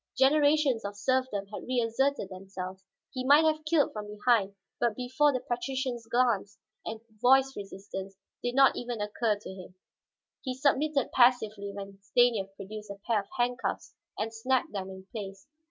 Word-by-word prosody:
Generations 285 Hz, -2 st, +4 dB
of 200 Hz, 0 st, -5 dB
serfdom 255 Hz, -2 st, 0 dB
had -, -, -6 dB
reasserted 245 Hz, -1 st, 0 dB
themselves; 190 Hz, 0 st, -7 dB, 0.3 s
he 255 Hz, -, -4 dB
might 290 Hz, +4 st, +6 dB
have 310 Hz, 0 st, +1 dB
killed 310 Hz, -2 st, +2 dB
from 210 Hz, -1 st, -5 dB
behind, 210 Hz, -1 st, +1 dB, 0.2 s
but 235 Hz, -3 st, +1 dB
before 260 Hz, +4 st, +2 dB
the 255 Hz, -2 st, -2 dB
patrician's 245 Hz, -1 st, -3 dB
glance 230 Hz, -4 st, +1 dB, 0.3 s
and 220 Hz, 0 st, -6 dB, 0.2 s
voice 265 Hz, +2 st, +5 dB
resistance 195 Hz, -1 st, -7 dB, 0.2 s
did 245 Hz, 0 st, -2 dB
not 270 Hz, 0 st, +6 dB
even 240 Hz, -2 st, -4 dB
occur 210 Hz, +1 st, 0 dB
to 205 Hz, -, -10 dB
him. 185 Hz, -1 st, -11 dB, 0.7 s
He 255 Hz, -2 st, -3 dB
submitted 280 Hz, +1 st, +1 dB
passively 220 Hz, -5 st, +3 dB
when 200 Hz, -1 st, -8 dB
Stanief 215 Hz, -1 st, +3 dB
produced 210 Hz, +2 st, -8 dB
a 200 Hz, -, -7 dB
pair 230 Hz, -3 st, +2 dB
of 195 Hz, -, -7 dB
handcuffs 245 Hz, 0 st, -1 dB, 0.2 s
and 225 Hz, +1 st, -2 dB
snapped 255 Hz, +3 st, 0 dB
them 195 Hz, -2 st, -4 dB
in 190 Hz, 0 st, -10 dB
place. 195 Hz, -4 st, -7 dB
230 Hz, 155 wpm, -29 LUFS, 200-260 Hz, 0.7 s, might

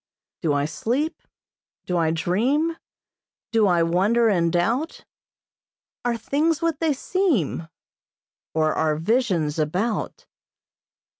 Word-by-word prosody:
"Do 160 Hz, -4 st, +1 dB
I 145 Hz, 0 st, +1 dB
sleep? 250 Hz, -, -2 dB, 0.6 s
Do 180 Hz, -, -2 dB
I 165 Hz, -2 st, +2 dB
dream? 245 Hz, -, +1 dB, 0.8 s
Do 220 Hz, -3 st, +4 dB
I 175 Hz, -2 st, +3 dB
wonder 205 Hz, +8 st, +3 dB
and 170 Hz, -4 st, +2 dB
doubt? 230 Hz, -, -1 dB, 1.0 s
Are 240 Hz, -1 st, 0 dB
things 300 Hz, +7 st, 0 dB
what 330 Hz, -3 st, -1 dB
they 325 Hz, -2 st, +2 dB
seem? 270 Hz, -, 0 dB, 0.9 s
Or 155 Hz, -1 st, +2 dB
are 155 Hz, -1 st, +1 dB
visions 170 Hz, -, 0 dB
about?" 185 Hz, +10 st, -2 dB
205 Hz, 105 wpm, -23 LUFS, 165-270 Hz, 1.0 s, Do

